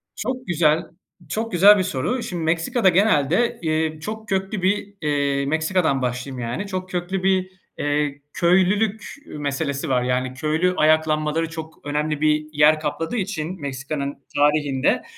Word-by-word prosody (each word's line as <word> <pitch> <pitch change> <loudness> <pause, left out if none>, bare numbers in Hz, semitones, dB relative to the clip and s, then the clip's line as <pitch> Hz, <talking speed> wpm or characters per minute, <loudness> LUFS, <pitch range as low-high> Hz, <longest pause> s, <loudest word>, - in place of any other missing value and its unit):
Çok 255 -1 -4
güzel, 165 -1 +2 0.5
çok 225 +1 -2
güzel 200 +3 +7
bir 185 - +1
soru. 180 - -2
Şimdi, 175 -2 -4
Meksika'da 170 +7 +2
genelde, 185 - +2
eee, 155 -1 -1
çok 220 +5 -6
köklü 195 +1 -1
bir, 200 +2 0
eee 140 -2 0
Meksika'dan 160 -1 +1
başlayayım, 125 +1 -3
yani, 125 - -3
çok 185 -1 -4
köklü 180 +1 -3
bir, 185 -1 +2 0.3
eee, 145 -1 -1
köylülük 195 +5 +2 0.2
meselesi 140 0 -3
var, 125 -2 +2
yani, 125 +1 -1
köylü 155 +6 0
ayaklanmaları 155 +1 +2
çok 160 -2 -9
önemli 150 +1 -1
bir 155 0 +2
yer 150 +1 +5
kapladığı 160 +8 -3
için 185 -4 -3
Meksika'nın 140 +1 -4 0.2
tarihinde 145 -2 +2
160 Hz, 140 wpm, -22 LUFS, 145-185 Hz, 0.5 s, güzel